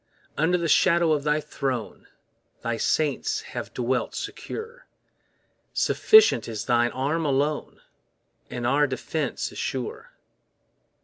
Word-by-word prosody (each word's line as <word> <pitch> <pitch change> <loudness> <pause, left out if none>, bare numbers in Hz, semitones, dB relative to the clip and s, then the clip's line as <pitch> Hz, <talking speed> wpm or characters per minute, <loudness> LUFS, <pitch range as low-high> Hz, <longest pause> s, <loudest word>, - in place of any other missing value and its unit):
Under 165 +4 +2
the 170 -1 -1
shadow 170 +1 +4
of 150 -2 +1
thy 150 +1 +2
throne, 130 -6 -4 0.6
Thy 115 0 -1
saints 145 +4 0
have - - -7
dwelt 125 +1 -1
secure; 470 +3 -7 0.9
Sufficient 435 -1 +5
is 110 -2 -5
thine 120 -1 +3
arm 145 +7 -1
alone, 145 +1 -1 0.7
And 120 -1 -4
our 145 +4 +3
defence 140 +2 -3
is - - -8
sure. 130 -3 -4
145 Hz, 115 wpm, -25 LUFS, 125-160 Hz, 0.9 s, Sufficient